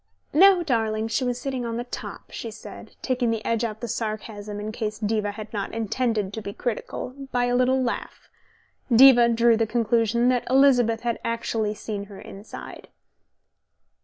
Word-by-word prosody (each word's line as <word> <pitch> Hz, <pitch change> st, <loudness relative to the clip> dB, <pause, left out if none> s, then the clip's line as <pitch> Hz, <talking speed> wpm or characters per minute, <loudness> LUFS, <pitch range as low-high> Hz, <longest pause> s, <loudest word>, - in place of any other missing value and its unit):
"No, 370 Hz, +3 st, +6 dB
darling, 225 Hz, -6 st, 0 dB
she 225 Hz, +4 st, 0 dB
was 245 Hz, -1 st, -1 dB
sitting 260 Hz, -1 st, -3 dB
on 230 Hz, -1 st, -3 dB
the 240 Hz, -, -2 dB
top," 245 Hz, -, -8 dB
she 230 Hz, -, -6 dB
said, 220 Hz, -, -11 dB
taking 250 Hz, -2 st, 0 dB
the 225 Hz, -1 st, -2 dB
edge 230 Hz, 0 st, 0 dB
off 220 Hz, -2 st, -4 dB
the 240 Hz, -, -3 dB
sarcasm, 215 Hz, -2 st, -4 dB
in 210 Hz, +1 st, -4 dB
case 215 Hz, -1 st, -4 dB
Diva 210 Hz, -1 st, -1 dB
had 215 Hz, +1 st, -9 dB
not 205 Hz, +1 st, -4 dB
intended 225 Hz, -2 st, -1 dB
to 220 Hz, -, -5 dB
be 200 Hz, -1 st, -6 dB
critical, 245 Hz, +2 st, -4 dB, 0.2 s
by 245 Hz, 0 st, +1 dB
a 245 Hz, 0 st, +1 dB
little 255 Hz, +1 st, +3 dB
laugh. 250 Hz, -2 st, -4 dB, 0.6 s
Diva 240 Hz, 0 st, +8 dB
drew 230 Hz, 0 st, +4 dB
the 225 Hz, 0 st, +1 dB
conclusion 235 Hz, +1 st, +1 dB
that 250 Hz, -1 st, 0 dB
Elizabeth 250 Hz, -4 st, +4 dB
had 235 Hz, -1 st, -2 dB
actually 225 Hz, -2 st, -1 dB
seen 205 Hz, -1 st, -5 dB
her 200 Hz, -1 st, -12 dB
inside. 200 Hz, +2 st, -10 dB
230 Hz, 170 wpm, -24 LUFS, 215-245 Hz, 0.6 s, Diva